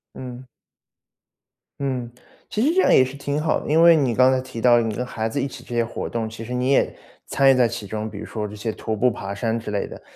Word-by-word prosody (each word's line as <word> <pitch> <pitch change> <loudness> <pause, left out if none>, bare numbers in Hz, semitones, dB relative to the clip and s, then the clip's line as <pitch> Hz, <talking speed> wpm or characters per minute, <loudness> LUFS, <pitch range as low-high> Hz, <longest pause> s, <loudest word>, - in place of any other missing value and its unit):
嗯。 125 0 -8 1.4
嗯， 130 -3 -2 0.4
其 215 - -1
实 295 +7 +3
这 380 - +5
样 - - +4
也 130 - +6
是 130 +2 -8
挺 140 +1 -2
好 155 0 +1
的。 - - -7
因 160 +2 +5
为 170 0 +8
你 135 -6 +1
刚 130 +3 +5
才 130 - 0
提 130 -2 -8
到 120 0 +6
你 115 -2 -2
跟 125 +4 -3
孩 110 -2 -3
子 - - -2
一 - - -1
起 135 - -11
这 120 - -9
些 120 0 +2
活 115 - -5
动， 115 -1 -3
其 115 0 -9
实 120 +2 -6
你 125 +2 0
也 140 - +2 0.3
参 135 0 +3
与 - - +7
在 125 -2 +4
其 115 -3 -6
中。 110 +1 -4
比 - - -10
如 - - -6
说 110 -2 -4
这 105 - -10
些 105 +2 -4
徒 110 - -4
步 125 +4 +3
爬 100 -3 -5
山 110 +3 -1
之 110 -2 -6
类 100 - -1
的， - - -11
125 Hz, 290 characters per minute, -22 LUFS, 110-135 Hz, 1.4 s, 为